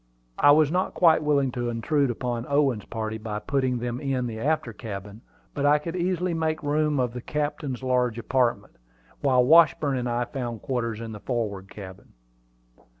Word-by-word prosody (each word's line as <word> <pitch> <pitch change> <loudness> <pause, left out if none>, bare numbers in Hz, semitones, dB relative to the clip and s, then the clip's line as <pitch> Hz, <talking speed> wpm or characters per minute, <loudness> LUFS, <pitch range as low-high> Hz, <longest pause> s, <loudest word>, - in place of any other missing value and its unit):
I - - +6
was 150 0 +5
not 185 +2 -1
quite 165 -3 +5
willing 140 -3 +2
to 120 -1 -3
intrude 135 +5 0
upon 120 0 -3
Owen's 140 -7 +1
party 110 -1 -4
by 110 -1 -4
putting 130 +3 0
them 120 +1 -3
in 135 -3 -1
the 110 -2 -5
after 140 -3 -1
cabin; 105 -1 -8 0.3
but 140 - -3
I 145 +1 +5
could 165 +3 -5
easily 180 0 0
make 160 -1 -1
two 145 - -3
rooms 150 -1 +1
of 125 -2 -1
the 125 - -6
captain's 145 -2 -3
large 125 -2 +1
apartment, 120 -4 -1 0.4
while 130 -3 +3
Washburn 150 -3 +5
and 125 0 -2
I 120 +1 0
found 120 -3 -5
quarters 115 -4 -2
in 115 -1 -6
the 105 - -8
forward 105 -5 -3
cabin. 95 -3 -11
125 Hz, 180 wpm, -25 LUFS, 115-145 Hz, 0.4 s, I